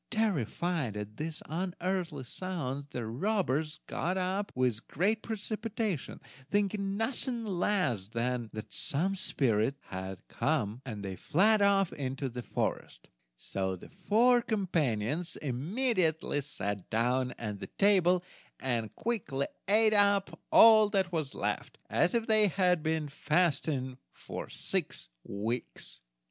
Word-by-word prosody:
Terrified 175 - 0
at 105 +1 -6
these 155 0 -4
unearthly 175 -2 -2
sounds, 145 -2 -4
the 125 -5 -4
robbers 155 - 0
got 180 +3 -2
up 190 +2 -1
with 125 -3 0
great 210 +8 +1
precipitation, 215 - -3 0.3
thinking 200 -1 0
nothing 235 +1 0
less 175 - 0
than 120 +1 -2
that 110 -3 -7
some 140 - +2
spirits 135 - +1
had 95 0 -6
come, 125 -7 -1
and 105 -4 -5
fled 210 +6 +4
off 200 -2 +3
into 135 -1 -3
the 125 0 -6
forest, - - -3 0.3
so 95 +7 -2
the 90 - -12
four 230 +7 +3
companions 165 - 0
immediately 160 - 0
sat 100 -8 -3
down 125 +3 +1
at 105 -3 -5
the - - -6
table, 185 -3 +3 0.4
and 115 -5 -2
quickly 175 - -1 0.2
ate 215 +2 +5
up 200 -1 +3
all 220 -2 +8
that 190 -3 +1
was 155 -5 -2
left, - - -3
as 180 - +3
if 230 -1 +1
they 215 -2 +5
had 180 -3 +2
been 160 -1 0
fasting 145 -4 0
for - - -7
six - - -3
weeks. 110 - -4
160 Hz, 125 wpm, -31 LUFS, 125-200 Hz, 0.4 s, all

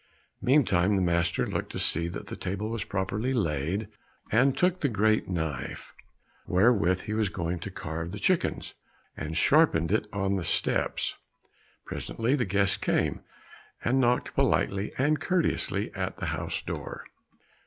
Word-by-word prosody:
Meantime 105 -8 +3
the - - +2
master 85 -1 +1
looked - - -3
to - - -5
see 85 +1 0
that 85 - -6
the - - -6
table 100 +4 -3
was 115 -3 -2
properly 100 +6 -2
laid, 85 - -1 0.4
and 130 +5 +4
took 180 0 +2
the 145 - +2
great 110 0 +2
knife, 80 -7 -4 0.5
wherewith 95 -2 +3
he 105 - -4
was 110 -2 +1
going 85 -2 -3
to 90 - -5
carve 85 -2 -5
the 105 - -5
chickens, 180 - 0 0.4
and 80 +1 -4
sharpened 90 - +4
it 105 0 +1
on 100 -1 0
the 90 - -2
steps. - - 0 0.7
Presently 115 +3 -2
the 125 - 0
guest 100 0 +1
came, - - 0 0.6
and 130 +3 +3
knocked 125 0 +1
politely 100 +1 +1
and 150 +3 +2
courteously 180 -3 0
at - - -3
the - - -4
house - - -3
door. - - -6
100 Hz, 150 wpm, -28 LUFS, 85-120 Hz, 0.7 s, and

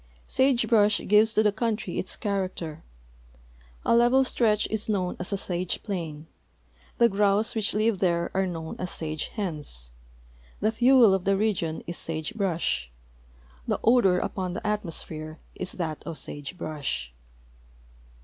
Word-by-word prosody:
Sage 260 -2 +2
brush 210 -3 +4
gives 215 +2 +4
to 215 - +4
the 210 - +4
country 220 -3 -2
its 185 - -1
character. 185 -6 -3 1.0
A - - +4
level 240 +3 +5
stretch 220 -4 +2
is 220 0 0
known 185 -4 0
as 180 - -2
a 200 - 0
sage 180 -1 -2
plain; 165 -7 -4 0.7
the 235 - +6
grouse 205 +1 +2
which 215 -3 0
live 215 -2 +2
there 170 -2 +1
are 190 0 +1
known 165 -2 -5
as 180 - -3
sage 155 -2 -3
hens; 150 - -5 0.7
the 215 - +2
fuel 240 -2 +6
of 190 -1 0
the 195 0 +3
region 190 -7 -1
is 170 - -4
sage 160 -1 -3
brush; 170 - -1 0.8
the - - 0
odor 225 -6 +5
upon 185 -1 -2
the - - -6
atmosphere 165 -6 -3 0.2
is 185 - -4
that 160 -4 -4
of 160 - -6
sage 145 +5 -6
brush. 145 - -4
190 Hz, 150 wpm, -26 LUFS, 165-215 Hz, 1.0 s, the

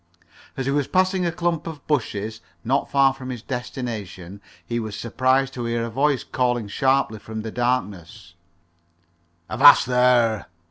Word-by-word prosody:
As 135 - -2
he 135 - 0
was 145 -1 0
passing 185 -1 +1
a - - 0
clump 170 -1 -2
of 155 -4 -8
bushes, 110 -6 -2 0.2
not 135 +4 0
far 135 -1 +4
from 130 -1 -9
his 120 -3 -6
destination, 105 -7 -6 0.2
he 120 0 -2
was 110 -3 -5
surprised 130 +3 0
to 120 -2 -5
hear 115 0 -1
a 115 - -6
voice 135 +2 +1
calling 120 -4 -1
sharply 130 -1 +1
from 110 +1 -7
the 110 - -5
darkness: 105 -7 -3 1.1
"Avast - - +7
there!" 125 -3 +2
125 Hz, 150 wpm, -23 LUFS, 110-135 Hz, 1.1 s, Avast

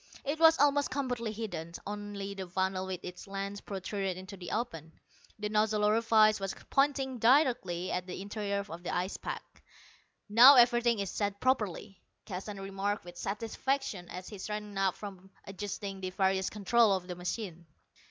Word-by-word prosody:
It 290 +3 -2
was 325 0 +7
almost 285 0 +3
completely 250 -4 -2
hidden; 180 -7 -5
only 205 -1 -5
the 190 -2 -6
funnel 190 +1 -1
with 185 -1 -4
its 180 +2 -8
lens 195 +1 -4
protruded 195 -1 -3
into 190 +2 -8
the 175 -2 -8
open. 165 -9 -4 0.4
The 210 0 -2
nozzle 215 0 +1
orifice 215 0 +4
was 195 -1 -3 0.2
pointing 270 -2 +1
directly 235 - +3
at 180 0 -2
the 180 - -6
interior 200 0 -3
of 170 -2 -8
the 175 - -5
ice 180 +2 -1
pack. - - -7 0.7
"Now 240 +7 +9
everything 240 -1 +5
is 200 -2 -2
set 200 -1 -2
properly," 210 -6 -1 0.2
Keston 195 +1 -6
remarked 195 +1 -3
with 175 0 -10
satisfaction 225 +1 -2
as 180 +1 -7
he 205 - -9
straightened 210 0 -5
up 190 -2 +2
from 195 -2 -9 0.2
adjusting 195 0 -5
the 185 - -2
various 190 0 +1
controls 210 -2 +3
on - - -17
the 180 - -5
machine. 180 -1 -5
200 Hz, 160 wpm, -31 LUFS, 190-225 Hz, 0.7 s, Now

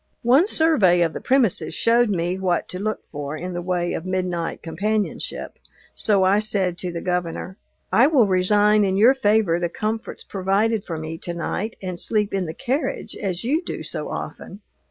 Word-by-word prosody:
One 265 - +5
survey 230 - +4
of 165 - -1
the - - -6
premises 255 -8 +1
showed 235 0 +3
me 180 -1 -1
what 180 -2 0
to 180 - -5
look 215 +2 -3
for 145 0 -5
in 180 +3 -5
the 175 - -3
way 175 -1 -1
of - - -4
midnight 180 -2 -3
companionship, 205 +6 -3 0.3
so 200 -3 +2
I 195 +2 +4
said 195 -4 0
to 180 - -3
the 170 -1 -5
Governor, 180 +1 -3 0.4
"I 235 +7 +6
will 280 -7 +4
resign 205 +3 +3
in 190 -1 +1
your 230 +6 +6
favor 210 -9 +2
the 175 -1 -1
comforts 220 +5 -4
provided 200 +3 0
for 165 - -4
me 160 +1 -6
to 175 -1 -5
night, 200 +6 -3
and 180 -2 -4
sleep 210 -2 0
in 190 -3 -1
the 160 - -6
carriage, 270 +3 -2
as 190 -2 -3
you 290 +8 +1
do - - -5
so - - -3
often." 200 - -7
190 Hz, 185 wpm, -22 LUFS, 175-220 Hz, 0.4 s, I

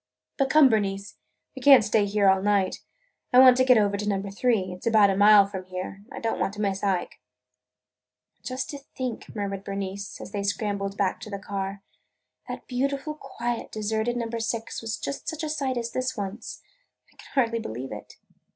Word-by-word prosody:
But 275 -1 +1
come, 305 -1 +7
Bernice, 200 -3 -1 0.4
we 265 - -8
can't 270 -3 +8
stay 210 0 +2
here 200 0 +2
all 190 0 +4
night. 200 -2 +1 0.5
I 250 - +4
want 255 -1 +9
to 255 - +4
get 255 -2 +6
over 200 -1 +2
to 210 +1 -2
Number 195 0 -2
Three. 205 -3 +1
It 180 - -11
's - - -3
about 215 -3 +5
a - - 0
mile 205 0 +7
from 190 -2 -7
here. 185 +2 -6
I - - -6
don't 225 - -2
want 195 - -1
to - - -9
miss 195 -1 -1
Ike." 190 -3 -1 1.2
"And - - -45
just 255 0 -4
to 285 - -7
think," 255 -5 -6
murmured 200 -2 -3
Bernice, 195 0 -5
as - - -9
they 205 - -2
scrambled 200 0 -2
back 190 -2 0
to 220 0 -9
the 200 - -4
car, 195 0 -5 0.6
"that - - -7
beautiful, 275 +4 -2
quiet, 240 -5 -5
deserted 220 +2 -1
Number 230 -1 -3
Six 225 0 -3
was 225 -1 -3
just 280 - -5
such 320 0 -5
a 310 - -2
sight 275 -4 -1
as 235 -1 -3
this 255 0 -2
once! 205 +2 -6 0.5
I - - -34
can - - -14
hardly 230 -3 +2
believe 130 - -6
it!" 105 - -9
210 Hz, 200 wpm, -26 LUFS, 195-245 Hz, 1.2 s, want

